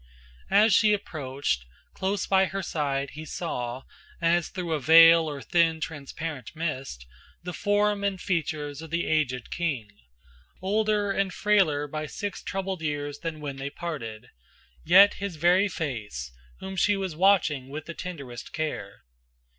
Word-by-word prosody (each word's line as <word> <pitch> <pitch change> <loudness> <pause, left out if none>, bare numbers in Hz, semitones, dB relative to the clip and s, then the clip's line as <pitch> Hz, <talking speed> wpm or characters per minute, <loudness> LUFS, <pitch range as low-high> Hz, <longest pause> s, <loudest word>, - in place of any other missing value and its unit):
As 210 +2 +5
she 215 -2 +5
approached, 140 - -2 0.3
close 195 0 -1
by 190 0 +4
her 195 +2 -4
side 140 -4 -2
he 155 +2 -8
saw, 130 -6 -4 0.4
As 170 0 +2
through 175 -3 -3
a 155 - 0
veil 165 +2 +7
or 140 -2 -6
thin 165 -2 +2
transparent 150 -2 -6
mist, 135 - -4 0.4
The 180 0 -5
form 205 +1 +1
and 200 -2 -1
features 155 -5 -2
of 160 - -9
the 170 +2 -1
aged 130 -6 0
king, 140 -12 -2 0.7
Older 210 +1 +1
and 195 -1 0
frailer 180 -9 +2
by 155 +1 -5
six 205 +5 -5
troubled 190 -2 -3
years 145 -1 -3
Than 160 -2 -5
when 140 -2 -5
they 135 +1 -4
parted, 140 -9 -6 0.5
yet 195 +5 +7
his 200 -4 -3
very 175 +5 +4
face, 110 - -5 0.3
Whom 190 0 -6
she 205 +2 +3
was 190 -5 -3
watching 160 -7 +3
with 155 +2 -6
the 170 - -6
tenderest 140 -10 -8
care. 120 -11 -4
160 Hz, 145 wpm, -27 LUFS, 145-190 Hz, 0.7 s, veil